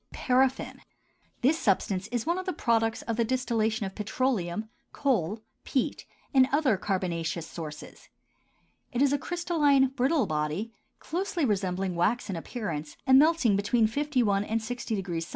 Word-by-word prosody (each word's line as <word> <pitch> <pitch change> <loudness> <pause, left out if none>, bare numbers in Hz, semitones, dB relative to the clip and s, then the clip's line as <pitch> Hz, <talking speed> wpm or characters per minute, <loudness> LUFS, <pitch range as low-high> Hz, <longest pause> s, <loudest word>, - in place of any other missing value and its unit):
PARAFFIN. 260 +1 +1 0.6
This 310 +6 +3
substance 195 - +1
is 240 +1 -2
one 340 +3 0
of 370 - -7
the 370 - 0
products 225 -5 +1
of 230 -1 -3
the 235 - +3
distillation 225 -3 0
of 190 - -5
petroleum, 215 -3 -1 0.3
coal, 220 - 0 0.2
peat, 260 - -2 0.3
and 260 -1 +5
other 280 -6 +3
carbonaceous 175 -4 -2
sources. 155 -3 -9 0.8
It 245 +2 +2
is 285 0 +3
a 285 - +1
crystalline, 300 -6 +2
brittle 270 +3 +1
body, 155 +9 -2 0.2
closely 360 -1 -2
resembling 190 -3 -1
wax 200 +6 0
in - - -3
appearance 165 - -5
and 265 -1 +7
melting 305 -8 +4
between 215 +3 +2
51 235 -5 +1
and 220 +2 -1
60° 215 -7 -3
C. - - -11
225 Hz, 145 wpm, -28 LUFS, 195-270 Hz, 0.8 s, and